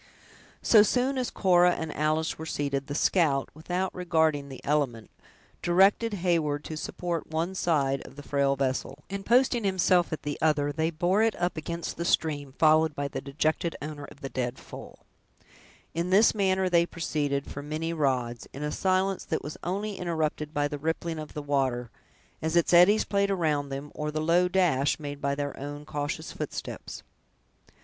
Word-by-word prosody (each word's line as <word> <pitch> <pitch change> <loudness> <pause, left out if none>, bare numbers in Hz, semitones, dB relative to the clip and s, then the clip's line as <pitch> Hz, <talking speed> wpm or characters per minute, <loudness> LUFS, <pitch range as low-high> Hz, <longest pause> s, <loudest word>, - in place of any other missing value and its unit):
So 220 - +7
soon 255 +5 +1
as 250 - -1
Cora 180 -2 +4
and 160 -1 -5
Alice 155 +1 0
were 160 - -5
seated, 140 -3 -2
the 145 - -4
scout, 145 -6 +2
without 180 +4 -3
regarding 160 -5 +1
the 135 - -8
element, 140 -7 -1 0.5
directed 195 +5 +3
Heyward 165 -6 0
to 160 - -6
support 170 +1 -4
one 165 +4 -1
side 140 -7 +1
of - - -14
the 145 - -9
frail 140 -1 +1
vessel, 130 -1 -2
and 200 0 -4
posting 240 +1 +3
himself 185 -2 +2
at 155 - -4
the 145 0 -4
other, 150 -2 +2
they 160 +2 0
bore 175 +5 +1
it 225 -1 +2
up 175 0 0
against 170 +2 -5
the 170 - -2
stream, 145 -5 0
followed 155 -1 +4
by 140 0 -2
the - - -5
dejected 155 +4 -1
owner 145 -1 -6
of 140 - -15
the 135 - -5
dead 125 -1 -3
foal. - - -12 0.9
In 170 +2 -1
this 200 +4 +5
manner 190 -2 +1
they 170 -1 +3
proceeded, 145 -5 -2
for 140 - -7
many 155 +3 -3
rods, 130 -6 -1
in 140 - -6
a 150 - -2
silence 190 +2 +1
that 160 - -2
was 150 - -6
only 200 +3 -3
interrupted 155 -3 -2
by 145 -1 0
the 145 -1 -6
rippling 160 +1 -2
of 155 -1 -8
the 150 - -4
water, 130 -4 0 0.5
as 160 +1 -1
its 170 +1 +3
eddies 180 +5 +6
played 200 -1 +1
around 155 -7 0
them, 140 +2 -6
or 150 0 -3
the 155 +1 -2
low 170 +3 +3
dash 175 -7 +2
made 145 -1 -6
by 140 0 0
their 145 0 -3
own 145 +1 -6
cautious 145 -1 -4
footsteps. - - -6
155 Hz, 180 wpm, -28 LUFS, 145-180 Hz, 0.9 s, So